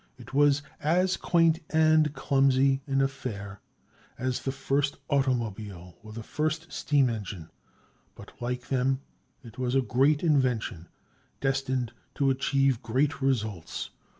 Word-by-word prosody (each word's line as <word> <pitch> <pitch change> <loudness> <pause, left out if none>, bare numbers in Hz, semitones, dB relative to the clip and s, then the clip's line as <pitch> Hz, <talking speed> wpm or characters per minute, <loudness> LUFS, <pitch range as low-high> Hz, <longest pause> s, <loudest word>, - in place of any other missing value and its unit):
It 125 +1 -13
was 145 0 +4 0.2
as 180 +5 +2
quaint 165 -2 +3
and 155 -1 +4
clumsy 135 0 +3
an 135 -1 +1
affair 105 -7 -5 0.6
as 130 0 -2
the 135 - -2
first 140 +1 -1
automobile 110 -10 -1
or 110 - -11
the 115 +1 -7
first 155 +6 -2
steam 145 -3 +2
engine. 100 -8 -5 0.6
But, - - -12
like 125 0 -4
them, 130 0 +1 0.4
it 115 0 -12
was 125 0 0
a 135 - +4
great 135 +5 +2
invention, 125 - +1 0.5
destined 130 -3 -1 0.2
to 135 -1 +2
achieve 135 -1 +1
great 140 +6 0
results. 110 -11 -2
135 Hz, 125 wpm, -28 LUFS, 120-140 Hz, 0.6 s, was